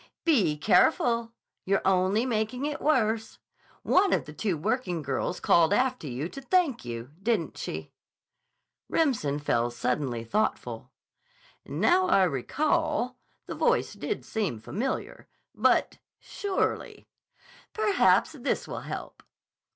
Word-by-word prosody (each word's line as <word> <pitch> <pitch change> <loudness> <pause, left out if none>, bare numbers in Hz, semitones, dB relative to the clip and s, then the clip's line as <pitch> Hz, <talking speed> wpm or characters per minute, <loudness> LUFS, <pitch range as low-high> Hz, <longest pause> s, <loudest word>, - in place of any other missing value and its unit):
"Be 205 - +3
careful! 230 - +3 0.3
You're 195 +1 +1
only 190 +4 +2
making 240 +2 -1
it 295 0 -3
worse. 225 -7 +1 0.5
One 385 0 +3
of - - +1
the 150 - -10
two 185 +1 -1
working 180 - -1
girls 140 +6 -2
called 170 +3 +4
after 250 - 0
you 135 +4 -3
to 275 - -9
thank 310 -4 +1
you, 120 +2 -6
didn't 215 -5 0
she?" - - -6 1.0
Remsen 230 - +1
fell 120 -5 0
suddenly 120 0 -2
thoughtful. 215 - -2 0.8
"Now 370 +1 +2
I 195 - +4
recall, 265 - 0 0.3
the - - -6
voice - - +1
did - - -4
seem 200 - -2
familiar. 225 - -4 0.3
But—surely—" 400 -2 -1 0.6
"Perhaps 425 -3 +3
this - - -2
will - - -5
help." - - -7
220 Hz, 115 wpm, -27 LUFS, -, 1.0 s, called